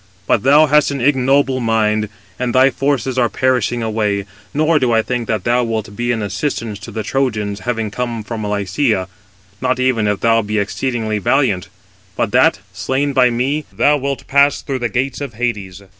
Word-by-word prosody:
But - - +2
thou 145 +4 +6
hast 150 0 +3
an 140 -1 -3
ignoble 135 0 +2
mind, 110 -2 +1 0.3
and 125 -1 -1
thy 130 +1 +5
forces 135 -2 -1
are 120 -2 +2
perishing 125 -2 0
away; 105 -3 -1 0.3
nor 155 +1 +2
do 125 -3 +1
I 110 -1 +3
think 120 -2 -3
that 110 -4 -1
thou 120 +1 +2
wilt 110 -3 -3
be 120 +2 -1
an 115 -3 -1
assistance 105 +1 -3
to 105 - -9
the 110 0 -4
Trojans, 105 -5 -1
having 115 -3 -3
come 120 -1 -3
from 110 0 -5
Lycia, 100 0 0 0.5
not 130 0 0
even 125 -4 +1
if 105 -1 -1
thou 115 0 +3
be 105 0 -3
exceedingly 110 +1 -1
valiant; 105 -4 +1 0.5
but - - -1
that, - - +3
slain 140 +2 -1
by 130 -2 +4
me, 135 +5 -1
thou 150 - +3
wilt 140 -2 -4
pass 140 +1 +3
through 135 -2 -3
the 120 -1 -1
gates 130 +6 -2
of 135 -6 -6
Hades." 100 -5 -3
120 Hz, 185 wpm, -17 LUFS, 105-135 Hz, 0.5 s, thou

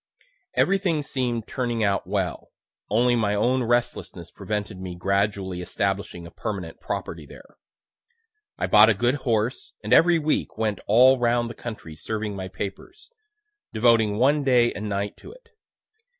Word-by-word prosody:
Everything 185 -6 +1
seem'd 125 -5 -2
turning 120 -3 -2
out 100 -3 0
well; 95 -3 -3 0.4
(only 120 +3 +3
my 105 -3 +1
own 125 +5 +1
restlessness 120 0 -2
prevented 105 -2 -4
me 90 -1 -6
gradually 100 0 -1
establishing 95 -1 -3
a 85 - -11
permanent 95 -7 -6
property - - -5
there.) - - -15 1.0
I - - -1
bought 105 +1 +7
a 110 - +3
good 120 +5 +1
horse, 120 -3 -2
and - - 0
every 170 0 +6
week 155 -7 -1
went 110 -2 -1
all 125 +5 +6
round 120 0 +1
the - - -8
country 105 -9 -8
serving 105 +3 -4
my 95 -1 -5
papers, 100 - -8 0.6
devoting 110 -2 +3
one 140 +5 +3
day 125 -3 +3
and 105 +1 -5
night 100 0 -3
to - - -12
it. - - -20
110 Hz, 150 wpm, -24 LUFS, 100-125 Hz, 1.0 s, bought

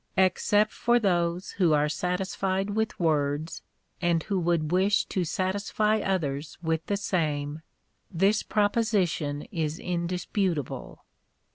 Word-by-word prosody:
Except 205 +3 +3
for 240 0 +2
those 175 -4 0
who 175 -5 +2
are 150 0 +3
satisfied 190 +4 -1
with 220 +1 -1
words, 155 -1 0 0.4
and 170 -2 +2
who 200 -3 -1
would 170 -3 0
wish 195 +3 +3
to 185 - -1
satisfy 200 +5 0
others 150 -7 -2
with 160 0 0
the 200 - 0
same, 155 -6 -1 0.5
this 195 +4 +2
proposition 205 -9 0
is 160 -4 -2
in 175 -1 -2
disputable. 180 - -3
180 Hz, 120 wpm, -27 LUFS, 160-200 Hz, 0.5 s, Except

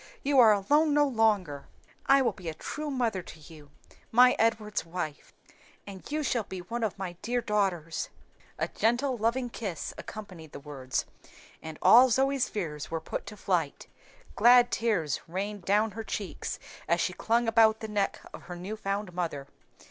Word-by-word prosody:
you 275 -1 +3
are 225 -3 +8
alone 290 +10 +3
no 295 0 +5
longer. 205 - +1 0.4
I 275 0 +6
will 245 - +2
be 180 -4 -7
a 155 - -6
true 300 - -5
mother 235 -8 -1
to 160 - -12
you 150 -2 -14 0.4
my 250 +2 +6
Edward's 220 -2 +1
wife 165 -3 -6 0.5
and 195 -2 -10
you 305 0 -1
shall 245 -4 0
be 190 -2 -8
one 230 +6 -4
of 215 -1 -2
my 180 -3 -6
dear 245 +2 -1
daughters." 190 -7 -1 0.5
A - - -1
gentle, 245 +4 0
loving 240 +2 -1
kiss 195 -10 -5
accompanied 185 -8 -9
the - - -7
words, 135 -3 -4 0.6
and 160 -1 -8
all 240 +8 +8
Zoe's 270 +2 +1
fears 155 -7 -4
were 165 - -2
put 160 - -6
to 210 0 -8
flight; 175 -7 -1 0.5
glad 245 +2 +6
tears 205 - 0
rained 195 +2 -4
down 210 +2 +2
her 225 +1 -6
cheeks 205 -2 -5 0.3
as - - +2
she - - 0
clung 230 +1 +1
about 220 -1 +4
the 220 - -4
neck 205 -2 -1
of - - -9
her 175 - -7
new 185 +5 -6
found 200 -2 -3
mother. 165 -6 -3
210 Hz, 170 wpm, -28 LUFS, 175-235 Hz, 0.6 s, are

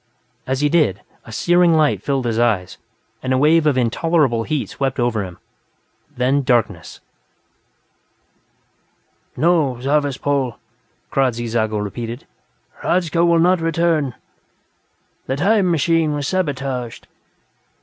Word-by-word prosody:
As 130 +1 -1
he 150 - +3
did, 145 - +1 0.2
a - - -11
searing 175 +6 +3
light 155 -2 +2
filled 135 -3 -1
his 115 -1 -1
eyes 110 -7 0 0.4
and 130 - -3
a - - +2
wave 155 +3 +4
of 140 -3 +2
intolerable 125 0 +1
heat 155 -3 -2
swept 135 -1 -3
over 120 -4 0
him. 90 -2 -9 0.8
Then 130 +3 +2
darkness... 120 -4 -1 2.4
"No, 150 -4 +2
Zarvas 140 0 0
Pol," 140 -5 -1 0.5
Kradzy 125 -3 0
Zago 110 -2 -1
repeated. 115 +4 -5 0.5
"Hradzka 170 -1 +1
will 170 -1 +4
not 180 +1 +3
return; 165 -5 0 1.1
the 130 - -1
'time 195 +5 +2
machine' 165 -1 +1
was 145 -1 -3
sabotaged." 135 -9 -3
140 Hz, 120 wpm, -19 LUFS, 120-165 Hz, 2.4 s, wave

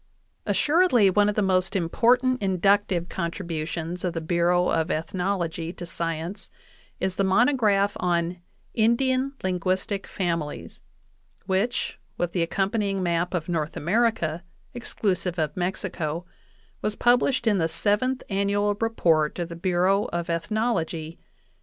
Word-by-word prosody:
Assuredly, 290 - +4
one 205 +2 +3
of 210 - -2
the 210 - +2
most 185 0 +1
important 245 +8 +2
inductive 190 -1 +2
contribu 170 -3 -4
tions 170 +1 -4
of 180 -2 -1
the 165 - -2
Bureau 175 +2 +2
of 165 +1 +1
Ethnology 170 -1 -2
to 175 - -8
science 170 +2 -4 0.5
is 190 -1 -2
the 195 - +2
monograph 205 -1 +3
on 175 0 0 0.4
"Indian 260 +4 +2
linguistic 185 +2 -1
families," 170 -5 -3 0.6
which, 195 +5 -1 0.2
with 175 -1 -1
the 175 - -1
accompanying 195 +3 0
map 175 +1 0
of 165 -2 -2
North 160 -3 -2
America, 175 -3 +1 0.3
exclusive 185 -6 -2
of 155 -3 -1
Mexico, 175 -2 -3 0.6
was 210 0 -1
published 245 +2 +3
in 210 -4 +3
the 165 - +2
Seventh 210 +10 0
Annual 200 +1 +1
Report 165 -9 +2
of 175 -1 -3
the 170 - -6
Bureau 185 +3 +2
of 170 0 -3
Ethnology 165 -3 -1
(1891). - - -36
185 Hz, 130 wpm, -25 LUFS, 170-210 Hz, 0.6 s, Assuredly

